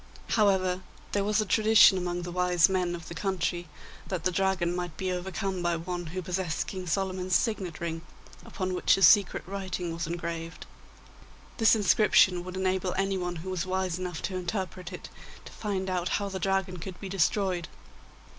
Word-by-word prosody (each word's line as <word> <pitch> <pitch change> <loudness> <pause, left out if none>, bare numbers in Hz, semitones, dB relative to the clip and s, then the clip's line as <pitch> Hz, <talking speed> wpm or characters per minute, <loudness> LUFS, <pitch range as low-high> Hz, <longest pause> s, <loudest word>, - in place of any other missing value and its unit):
However, 190 -4 +2 0.3
there 200 - +1
was 210 +1 +2
a - - -2
tradition 215 0 +6
amongst 175 -1 -2
the 175 - -5
wise 180 -2 +4
men 180 -2 0
of 170 - -9
the - - -7
country 175 -2 -2 0.4
that 180 -4 -3
the 185 - +2
Dragon 185 -2 +1
might 175 -3 -4
be 185 -1 -2
overcome 190 +1 -3
by 175 -1 +1
one 175 +1 -4
who 180 +4 -5
possessed 180 -2 -2
King 185 -2 -6
Solomon's 185 +1 0
signet 195 -8 0
ring, 165 -1 -3 0.4
upon 185 -1 -4
which 180 - +3
a 195 - 0
secret 200 +2 +6
writing 185 -3 -4
was 165 0 -3
engraved. 170 0 -5 0.9
This 225 0 +5
inscription 195 -3 +4
would 185 +1 -7
enable 190 -1 0
anyone 190 -2 -1
who 190 - -4
was 185 0 -2
wise 185 -1 -1
enough 180 -3 -5
to 190 - -3
interpret 185 0 -4
it - - -8 0.4
to - - -10
find 195 -3 -3
out 180 -1 -1
how 200 -1 -3
the 190 -1 -4
Dragon 190 0 0
could 180 +2 -8
be 195 - -6
destroyed. 185 -1 0
185 Hz, 175 wpm, -28 LUFS, 175-190 Hz, 0.9 s, tradition